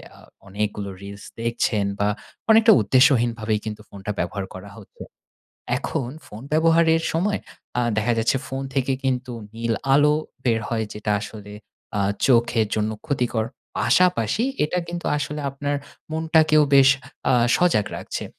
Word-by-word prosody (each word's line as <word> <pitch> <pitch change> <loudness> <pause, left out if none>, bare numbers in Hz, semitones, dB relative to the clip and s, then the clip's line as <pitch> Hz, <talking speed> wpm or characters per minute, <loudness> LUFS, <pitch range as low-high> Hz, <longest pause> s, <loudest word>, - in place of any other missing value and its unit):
আ - - -18 0.3
অনেকগুলো 100 0 -3
reels 100 0 -9 0.2
দেখছেন 115 -3 0
বা 105 - +2 0.4
অনেকটা 225 +1 +7
উদ্দেশ্যহীনভাবেই 120 -5 +3
কিন্তু 105 0 -5
ফোনটা 100 +1 -6
ব্যবহার 100 -2 -2
করা 95 +2 -9
হচ্ছে। 105 - -12 0.8
এখন 135 -3 -3 0.2
ফোন 105 +2 -10
ব্যবহারের 165 0 +4
সময় 200 +6 0 0.4
আ - - +3 0.2
দেখা 110 +3 +1
যাচ্ছে 115 +4 +2
ফোন 135 0 -4
থেকে 135 0 +1
কিন্তু 130 -1 -1 0.2
নীল 115 0 -1 0.2
আলো 150 +1 +5 0.3
বের 115 -2 +2
হয়, 110 -2 -1
যেটা 105 0 -4
আসলে 105 -1 -9 0.5
আ - - +1 0.3
চোখের 120 -3 +3
জন্য 110 0 0 0.2
ক্ষতিকর। 125 -5 0 0.3
পাশাপাশি 125 - +2 0.2
এটা 180 +4 -1
কিন্তু 175 0 -5
আসলে 150 0 -3
আপনার 145 +1 -2 0.3
মনটাকেও 160 -1 +3
বেশ 135 -1 +7 0.4
আ - - +5 0.2
সজাগ 170 - +2
রাখছে। - - -5
120 Hz, 135 wpm, -23 LUFS, 105-150 Hz, 0.8 s, অনেকটা